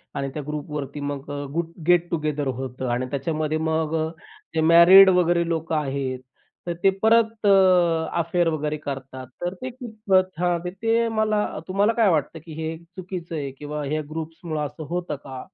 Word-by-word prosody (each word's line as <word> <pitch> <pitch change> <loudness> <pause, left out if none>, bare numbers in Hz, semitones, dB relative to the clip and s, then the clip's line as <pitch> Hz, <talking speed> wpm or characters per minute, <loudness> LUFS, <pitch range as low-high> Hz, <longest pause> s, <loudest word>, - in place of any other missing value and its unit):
आणि 135 0 -2
त्या 150 - -4
ग्रुपवरती 150 -1 -5
मग 145 -1 -5 0.2
गुट 165 0 -2 0.2
गेट 175 -1 +4
टुगेदर 150 -3 -1
होतं 130 0 -4
आणि 125 +2 -1
त्याच्यामध्ये 155 +2 -1
मग 160 0 -1 0.6
ते 160 - +2
मॅरीड 170 +4 +8
वगैरे 175 -2 +2
लोकं 160 -1 -1
आहेत, 135 -3 -2 0.5
तर 170 - -1
ते 195 - +7
परत 225 -1 +3
अ, - - +5 0.7
अफेअर 170 +1 +1
वगैरे 155 -1 -1
करतात. 135 -3 -7
तर 175 +1 -2
ते 260 - -3
कितपत 215 - -1
हां, 175 -1 +1
ते 225 +5 0
मला 215 -1 +1 0.2
तुम्हाला 200 +4 +2
काय 225 -4 +3
वाटतं 160 0 0
की 160 - -9
हे 160 0 -3
चुकीचं 175 -1 -7
आहे 140 -3 -3
किंवा 150 +2 -6
ह्या 155 +2 -1
ग्रुप्समुळं 160 -1 -4
असं 150 +2 -7
होतं 175 -2 -3
का? 135 -2 -9
160 Hz, 160 wpm, -24 LUFS, 150-180 Hz, 0.7 s, मॅरीड